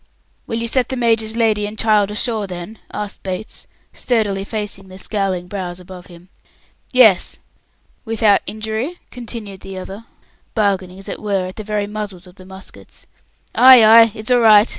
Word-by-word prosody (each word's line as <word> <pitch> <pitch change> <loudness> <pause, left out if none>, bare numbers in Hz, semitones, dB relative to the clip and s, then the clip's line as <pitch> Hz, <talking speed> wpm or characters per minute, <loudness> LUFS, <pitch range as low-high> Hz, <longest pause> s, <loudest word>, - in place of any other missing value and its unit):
"Will 225 - -3
you 230 0 -2
set 250 +1 0
the 260 - -3
major's 225 -2 +1
lady 215 -3 +1
and 210 +1 -9
child 210 -3 +3
ashore, 210 0 -2
then?" 180 +4 -8
asked 210 -1 -6
Bates, 190 +3 -6 0.3
sturdily 210 -5 -1
facing 205 -2 -5
the 185 0 -12
scowling 195 -3 -2
brows 180 -2 -6
above 180 0 -12
him. 175 0 -16 0.6
"Yes." 225 -8 +4 0.7
"Without 220 -3 +2
injury?" 220 +10 -4
continued 225 -5 -8
the 190 0 -9
other, 195 +4 -8 0.5
bargaining, 190 -4 0
as 195 - -10
it - - -6
were, 200 -3 -1
at 185 - -8
the 215 - -5
very 210 -1 -2
muzzles 205 -3 -6
of 180 - -15
the 185 0 -15
muskets. 190 0 -12 0.5
"Ay, 255 -3 +8
ay! 225 +1 +8
It's 215 +3 -5
all 245 - +5
right!" 215 -1 +6
210 Hz, 165 wpm, -18 LUFS, 190-225 Hz, 0.7 s, Ay